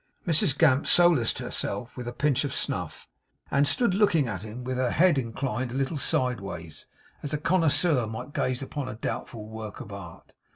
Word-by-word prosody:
Mrs 155 Hz, -5 st, +3 dB
Gamp 145 Hz, -4 st, +4 dB
solaced 170 Hz, -10 st, +4 dB
herself 125 Hz, 0 st, -3 dB
with 125 Hz, -2 st, -6 dB
a -, -, -2 dB
pinch 140 Hz, +1 st, +1 dB
of 140 Hz, -, -3 dB
snuff, -, -, -3 dB, 0.4 s
and 140 Hz, +1 st, +3 dB
stood 195 Hz, -, +3 dB
looking 180 Hz, -, +3 dB
at 100 Hz, -5 st, -4 dB
him 110 Hz, +4 st, -8 dB
with 130 Hz, 0 st, -3 dB
her 130 Hz, -1 st, +1 dB
head 170 Hz, -4 st, +4 dB
inclined 125 Hz, 0 st, -3 dB
a -, -, -6 dB
little 135 Hz, +3 st, -1 dB
sideways, 100 Hz, -, -2 dB, 0.3 s
as 145 Hz, 0 st, -4 dB
a -, -, 0 dB
connoisseur 160 Hz, -5 st, +2 dB
might 110 Hz, +6 st, -7 dB
gaze 130 Hz, +1 st, -1 dB
upon 135 Hz, -1 st, -5 dB
a 125 Hz, -, -6 dB
doubtful 110 Hz, -1 st, -5 dB
work 110 Hz, -1 st, -8 dB
of 100 Hz, -, -8 dB
art. 90 Hz, -4 st, -11 dB
130 Hz, 180 wpm, -27 LUFS, 115-150 Hz, 0.4 s, Gamp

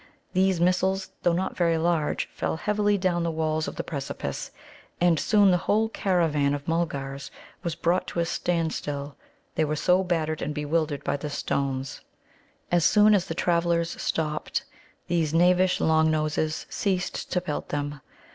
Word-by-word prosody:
These 190 Hz, -1 st, +2 dB
missiles, 190 Hz, +2 st, +1 dB
though 175 Hz, -, +3 dB
not 180 Hz, +3 st, -1 dB
very 170 Hz, -2 st, +2 dB
large, 160 Hz, -2 st, 0 dB
fell -, -, -2 dB
heavily 205 Hz, +2 st, +1 dB
down 185 Hz, -2 st, +1 dB
the 170 Hz, -, 0 dB
walls 155 Hz, -1 st, -1 dB
of -, -, -5 dB
the -, -, -3 dB
precipice. 140 Hz, -3 st, -5 dB, 0.5 s
And 170 Hz, -3 st, +3 dB
soon 205 Hz, -3 st, +4 dB
the 180 Hz, -, +4 dB
whole 220 Hz, +2 st, +3 dB
caravan 160 Hz, -9 st, +1 dB
of 145 Hz, 0 st, -8 dB
Mulgars 140 Hz, -5 st, -2 dB, 0.3 s
was 170 Hz, -3 st, -3 dB
brought 175 Hz, +2 st, 0 dB
to 175 Hz, -, -3 dB
a 170 Hz, -, +2 dB
standstill, 155 Hz, -5 st, -2 dB, 0.4 s
they 160 Hz, -, +1 dB
were 155 Hz, 0 st, 0 dB
so 180 Hz, +5 st, +3 dB
battered 160 Hz, -4 st, -1 dB
and 150 Hz, +1 st, -3 dB
bewildered 150 Hz, 0 st, -1 dB
by 140 Hz, 0 st, -1 dB
the 150 Hz, +1 st, -5 dB
stones. 135 Hz, -2 st, -2 dB, 0.7 s
As 175 Hz, -1 st, +3 dB
soon 210 Hz, +4 st, +6 dB
as 190 Hz, -3 st, +3 dB
the -, -, -4 dB
travellers 170 Hz, -1 st, +1 dB
stopped, 155 Hz, -1 st, -2 dB, 0.4 s
these 165 Hz, -2 st, 0 dB
knavish 180 Hz, +2 st, +4 dB
Long 160 Hz, 0 st, +3 dB
noses 155 Hz, 0 st, -1 dB
ceased 185 Hz, -3 st, -2 dB
to 180 Hz, -, +3 dB
pelt 165 Hz, -5 st, -4 dB
them. 145 Hz, -1 st, -3 dB
165 Hz, 160 wpm, -26 LUFS, 150-180 Hz, 0.7 s, soon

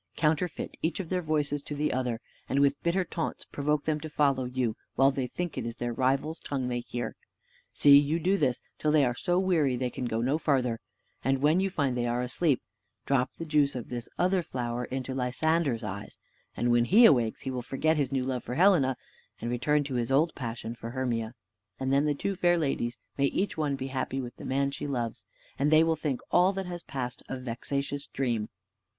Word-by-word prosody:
Counterfeit 160 Hz, +2 st, 0 dB
each 165 Hz, +4 st, -1 dB
of 180 Hz, -4 st, -4 dB
their 185 Hz, -1 st, 0 dB
voices 150 Hz, -3 st, 0 dB
to 145 Hz, -, -6 dB
the 150 Hz, +1 st, 0 dB
other, 125 Hz, -3 st, -1 dB, 0.3 s
and 135 Hz, -, 0 dB
with 140 Hz, 0 st, +3 dB
bitter 180 Hz, +2 st, +1 dB
taunts 165 Hz, -2 st, -4 dB
provoke 145 Hz, +1 st, -1 dB
them 155 Hz, -1 st, 0 dB
to 155 Hz, +1 st, -7 dB
follow 140 Hz, -3 st, +2 dB
you, 125 Hz, -3 st, -1 dB, 0.2 s
while 135 Hz, +1 st, +5 dB
they 135 Hz, -2 st, -2 dB
think 175 Hz, +6 st, -4 dB
it -, -, -3 dB
is 115 Hz, -, -5 dB
their 120 Hz, -1 st, -3 dB
rival's 135 Hz, +6 st, 0 dB
tongue 130 Hz, -3 st, -3 dB
they 120 Hz, -1 st, -1 dB
hear. 120 Hz, 0 st, -4 dB, 0.6 s
See 140 Hz, -1 st, +7 dB
you 145 Hz, +3 st, +1 dB
do 185 Hz, +4 st, +2 dB
this, 125 Hz, -10 st, 0 dB, 0.2 s
till 155 Hz, -, +1 dB
they 150 Hz, -2 st, +5 dB
are 120 Hz, -, +1 dB
so 175 Hz, +8 st, 0 dB
weary 170 Hz, -8 st, +2 dB
they 125 Hz, 0 st, -2 dB
can 125 Hz, -, -4 dB
go 115 Hz, -1 st, -1 dB
no 135 Hz, +6 st, +1 dB
farther; 125 Hz, -7 st, +1 dB, 0.4 s
and 135 Hz, +1 st, +2 dB
when 150 Hz, +5 st, +4 dB
you 195 Hz, +1 st, +1 dB
find 140 Hz, -8 st, 0 dB
they 120 Hz, -1 st, 0 dB
are 120 Hz, +1 st, 0 dB
asleep, 130 Hz, +2 st, +1 dB, 0.4 s
drop 130 Hz, -2 st, +1 dB
the 165 Hz, -, -6 dB
juice 150 Hz, -3 st, +2 dB
of 125 Hz, -, -5 dB
this 120 Hz, -1 st, -5 dB
other 185 Hz, +1 st, +2 dB
flower 125 Hz, -5 st, -3 dB
into 130 Hz, +1 st, -4 dB
Lysander's 130 Hz, 0 st, +1 dB
eyes, 100 Hz, -1 st, -6 dB, 0.4 s
and 120 Hz, 0 st, +2 dB
when 120 Hz, 0 st, +4 dB
he 220 Hz, -, +7 dB
awakes 120 Hz, -, +4 dB
he 135 Hz, -, -3 dB
will 125 Hz, -1 st, -3 dB
forget 155 Hz, +6 st, +1 dB
his 140 Hz, -3 st, 0 dB
new 135 Hz, -2 st, 0 dB
love 130 Hz, -1 st, -2 dB
for 125 Hz, -, -5 dB
Helena, 155 Hz, -8 st, +4 dB, 0.4 s
and 120 Hz, -, -3 dB
return 145 Hz, +5 st, +2 dB
to 140 Hz, -1 st, -5 dB
his 120 Hz, 0 st, -1 dB
old 155 Hz, +5 st, +3 dB
passion 115 Hz, -2 st, -5 dB
for 115 Hz, -1 st, -7 dB
Hermia; 120 Hz, -2 st, -2 dB, 0.4 s
and 130 Hz, 0 st, 0 dB
then 140 Hz, +2 st, +4 dB
the 150 Hz, -1 st, +1 dB
two 195 Hz, +7 st, -2 dB
fair 175 Hz, -1 st, +3 dB
ladies 135 Hz, -6 st, -1 dB, 0.2 s
may 140 Hz, -, +4 dB
each 190 Hz, +8 st, 0 dB
one 150 Hz, -3 st, 0 dB
be 135 Hz, 0 st, -5 dB
happy 130 Hz, 0 st, -2 dB
with 120 Hz, -2 st, -6 dB
the -, -, -9 dB
man 140 Hz, +1 st, +1 dB
she 140 Hz, -, -5 dB
loves, 120 Hz, -6 st, -3 dB, 0.4 s
and 140 Hz, +2 st, +3 dB
they 155 Hz, +1 st, +6 dB
will 165 Hz, 0 st, +2 dB
think 145 Hz, -5 st, -2 dB
all 180 Hz, +2 st, +5 dB
that 195 Hz, 0 st, -3 dB
has 175 Hz, -1 st, -5 dB
passed 125 Hz, -5 st, -5 dB
a 130 Hz, -, -3 dB
vexatious 140 Hz, +3 st, -3 dB
dream. 120 Hz, -5 st, -1 dB
135 Hz, 215 wpm, -29 LUFS, 125-155 Hz, 0.6 s, See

